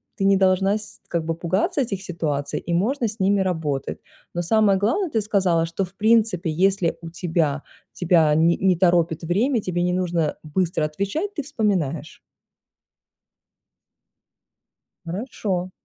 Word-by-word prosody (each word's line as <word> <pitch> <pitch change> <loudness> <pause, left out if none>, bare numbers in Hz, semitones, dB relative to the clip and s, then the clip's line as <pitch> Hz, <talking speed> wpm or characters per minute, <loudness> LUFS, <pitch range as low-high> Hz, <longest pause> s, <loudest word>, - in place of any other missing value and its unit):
ты - - -3
не 195 0 +5
должна 190 +2 +3
с 210 - -11
как 170 -2 -2
бы 165 - -1
пугаться 180 - 0
этих 200 -6 -3
ситуаций, 150 -5 -2
и 170 - -4
можно 235 +7 +1
с 215 +1 -7
ними 195 +1 +2
работать. 160 -7 -2 0.4
Но 175 - -1
самое 210 0 +3
главное, 240 - 0
ты 225 -6 0
сказала, 190 -5 +1
что 165 +4 -3
в 185 0 -9
принципе, 215 -5 +2
если 190 +1 +1
у 165 - -7
тебя 165 -4 -1 0.3
тебя 165 -4 +3
не 165 +2 +4
не 190 -1 +2
торопит 170 -2 +2
время, 220 - +1
тебе 175 -2 -2
не 180 0 +1
нужно 170 -4 -1
быстро 160 0 0
отвечать, 200 - -3
ты 310 - -3
вспоминаешь. 195 - -2 2.9
Хорошо. 185 -1 -3
180 Hz, 145 wpm, -23 LUFS, 165-205 Hz, 2.9 s, не